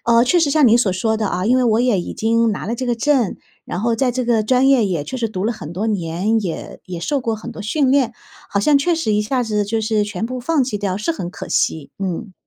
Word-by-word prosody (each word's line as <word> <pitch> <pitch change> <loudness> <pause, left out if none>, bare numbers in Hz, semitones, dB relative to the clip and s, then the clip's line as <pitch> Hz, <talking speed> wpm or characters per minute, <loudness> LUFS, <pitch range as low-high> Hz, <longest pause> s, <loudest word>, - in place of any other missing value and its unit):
呃， 235 +1 +4
确 350 +7 +3
实 300 -3 +2
像 295 -1 +4
您 230 0 +6
所 220 -6 +2
说 220 +4 0
的 215 -2 -1
啊， 185 +2 -2
因 250 +3 +4
为 255 - +2
我 225 -1 +3
也 245 -6 +2
已 - - -6
经 230 +1 +1
拿 205 - -4
了 230 - -1
这 255 +1 -4
个 240 - 0
证， 255 -4 +1 0.3
然 175 - -4
后 230 +2 +1
在 255 +2 +1
这 250 0 -2
个 230 -2 +2
专 255 +4 +3
业 265 -5 +4
也 175 -7 -1
确 260 - -5
实 235 -3 -1
读 190 -2 -4
了 230 - +1
很 170 -8 -8
多 200 +6 -2
年， 195 +2 0
也 175 -5 -6
也 180 -2 -5
受 280 - -1
过 225 -3 -2
很 230 +2 -8
多 220 - -8
训 265 +4 +1
练， 260 -4 +2 0.4
好 200 - 0
像 290 +7 +4
确 280 +5 +2
实 320 -10 -1
一 210 - +2
下 250 +4 0
子 210 -2 0
就 220 +2 -1
是 220 -1 +1
全 210 +2 -4
部 255 +1 -5
放 290 +1 +1
弃 245 -4 -3
掉 200 -2 -2
是 215 +12 -1
很 175 - -5
可 - - -8
惜， 155 -3 0
嗯。 190 +2 -4
225 Hz, 300 characters per minute, -19 LUFS, 205-255 Hz, 0.4 s, 您